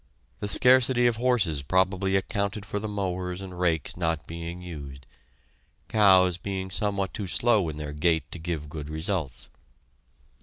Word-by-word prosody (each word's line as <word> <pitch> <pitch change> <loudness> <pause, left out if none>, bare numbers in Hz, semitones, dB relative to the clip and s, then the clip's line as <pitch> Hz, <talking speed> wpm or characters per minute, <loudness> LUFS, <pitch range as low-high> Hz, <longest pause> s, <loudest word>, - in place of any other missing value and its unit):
The 105 - -3
scarcity 125 +2 +4
of 120 -2 +3
horses 110 - +1
probably 95 +5 +1
accounted 100 +1 -1
for 105 0 -3
the 110 - -4
mowers 90 -3 -3
and 90 -2 -8
rakes 85 -5 0
not 80 -3 -1
being 85 +1 -6
used, 70 -7 -9 0.8
cows 95 -4 +5
being 95 0 -4
somewhat 100 -2 -1
too 100 - -4
slow 105 -3 +2
in 75 - -6
their 75 -1 -5
gait 80 +2 +1
to 85 - -6
give 80 -2 -4
good 75 0 -7
results. 80 - -2
90 Hz, 150 wpm, -27 LUFS, 80-100 Hz, 0.8 s, cows